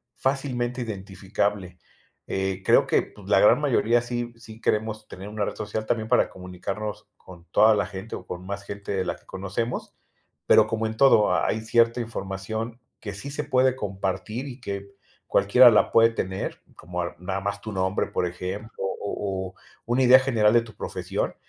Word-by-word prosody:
fácilmente 130 -2 -1
identificable, 95 -3 -3 0.5
eh, 95 0 -2
creo - - +5
que, - - +3
pues, 100 -2 -15
la 100 - +5
gran 105 - +6
mayoría 120 -4 +3
sí, 120 0 -4
sí 115 -1 -12
queremos 110 -1 -1
tener 95 +2 -9
una 105 -1 -2
red - - -3
social 110 0 -4
también 110 0 -1
para 125 - +4
comunicarnos 95 +3 -6
con 85 -2 -14
toda 110 +2 +6
la 100 - +1
gente 100 +3 -7
o - - -9
con 90 0 -7
más 100 0 -4
gente 100 0 -6
de 95 -1 -1
la - - -2
que - - -23
conocemos, 100 +6 -4 0.5
pero - - +7
como 110 0 -1
en 110 0 -6
todo, 110 -5 +5
ha - - +1
hay 110 - 0
cierta 115 +1 +3
información 110 +2 -5 0.2
que 100 -2 -6
sí 105 +8 -7
se 145 +1 -3
puede 130 -3 +3
compartir 105 +4 -3
y 130 -1 -8
que 100 -4 -5 0.4
cualquiera 120 +5 +7
la 110 - +3
puede 115 0 +6
tener, 95 -4 -4
como 90 +1 -5
a 85 - -5
nada 95 +2 -3
más 100 +1 -3
tu 110 +1 -6
nombre, 95 0 0
por - - -1
ejemplo, 95 +5 -6
o 95 - -1 0.5
o 90 - -13 0.3
una 120 +3 +2
idea 130 +1 +8
general 115 -5 +3
de 120 - +5
tu 115 -2 -12
profesión, - - -3
105 Hz, 185 wpm, -25 LUFS, 95-115 Hz, 0.5 s, idea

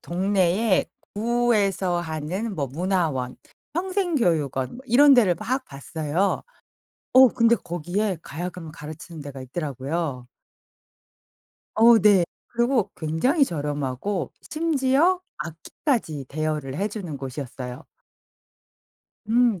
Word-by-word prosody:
동네에 190 +3 +1 0.3
구에서 205 -6 +1
하는 175 +7 -3
뭐 145 -4 -1
문화원, 155 -4 -1 0.4
평생교육원 255 - 0
뭐 - - -11
이런 280 +5 +7
데를 210 -9 +5
막 260 +9 -2
봤어요. 155 +6 -2 0.7
어 260 0 +9
근데 230 0 +3
거기에 180 +3 -2
가야금을 170 +2 -6
가르치는 155 +1 -9
데가 140 -2 -8
있더라고요. 140 -1 -4 1.5
어 230 +1 +7
네. 195 -3 +5 0.2
그리고 240 -3 +1
굉장히 175 - +2
저렴하고 145 +4 -2
심지어 315 +3 +2 0.2
악기까지 165 - -3
대여를 150 -2 -2
해주는 200 -6 -3
곳이었어요. 130 -2 -6 1.4
음. 230 -4 +3
180 Hz, 240 characters per minute, -24 LUFS, 150-230 Hz, 1.5 s, 어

